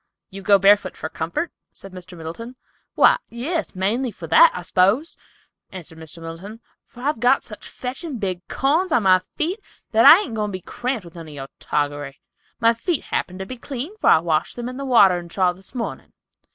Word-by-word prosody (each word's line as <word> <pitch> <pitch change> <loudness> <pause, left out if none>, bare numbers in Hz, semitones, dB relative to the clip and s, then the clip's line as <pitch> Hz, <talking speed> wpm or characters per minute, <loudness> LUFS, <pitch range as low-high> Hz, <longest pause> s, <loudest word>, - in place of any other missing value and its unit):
"You 195 +1 -8
go 200 0 +5
barefoot 195 0 +3
for 155 - -5
comfort?" 170 - -3 0.2
said 195 - -12
Mr. 185 -1 -11
Miller. 170 +10 -8 0.4
"Why, - - +5
yes, 305 - -3
mainly 220 +8 0
for 180 - -10
that, 320 - +6
I 180 - -5
suppose," 200 - +2 0.6
answered 165 -3 -10
Mr. 160 +1 -11
Middleton, 165 +7 -9 0.3
"for 245 - -14
I've 285 -2 -1
got 250 +3 +3
such 210 - -10
fetchin' 265 +3 -6
big 185 -4 -4
corns 320 +7 0
on 240 -8 +3
my 185 -1 +5
feet 350 +7 -2 0.3
that 225 0 +5
I 360 - +10
ain't 260 - -6
goin' 215 -1 -1
to - - -8
be - - -15
cramped 245 +1 -4
with 170 - -13
none 165 -2 -10
of 155 - -10
your 135 -1 -7
toggery. 145 -1 -3 0.4
My 230 -1 +4
feet 315 +7 -2
happen 185 - -3
to 190 - -5
be 255 +6 -8
clean, 275 - -6
for - - +2
I - - +7
washed 160 -1 -1
them 240 0 -5
in 255 0 -6
the 275 - -5
watering 190 -9 +4
trough 180 0 +1
this 190 +7 -12
mornin'. 235 -2 -5
205 Hz, 205 wpm, -22 LUFS, 175-255 Hz, 0.6 s, I